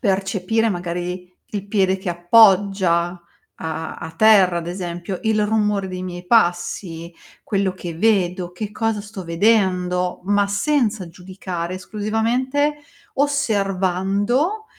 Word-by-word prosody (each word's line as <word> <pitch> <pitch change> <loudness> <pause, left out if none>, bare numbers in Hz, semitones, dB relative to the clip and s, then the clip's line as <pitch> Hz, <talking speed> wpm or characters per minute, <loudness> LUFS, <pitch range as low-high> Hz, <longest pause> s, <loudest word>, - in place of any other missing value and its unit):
percepire 195 +2 0
magari 180 0 -4 0.2
il 200 -1 -3
piede 190 -2 +2
che 185 -1 -3
appoggia 185 -2 +4
a 175 -1 -12 0.4
a 160 0 -5
a - - -7
terra, 195 -2 +5
ad 170 - -6
esempio, 175 +1 -5
il 220 -1 +2
rumore 210 -2 +1
dei 185 0 -5
miei 180 -1 -7
passi, 175 -4 0 0.3
quello 195 -2 0
che 175 -2 -7
vedo, 185 -2 +1
che 205 +3 -6
cosa 225 -1 -1
sto 205 -3 -8
vedendo. 180 -1 +1
Ma 205 0 +2
senza 220 - 0
giudicare, 180 0 -6
esclusivamente 235 +9 -1 0.4
osservando 210 - 0
190 Hz, 120 wpm, -21 LUFS, 180-215 Hz, 0.4 s, terra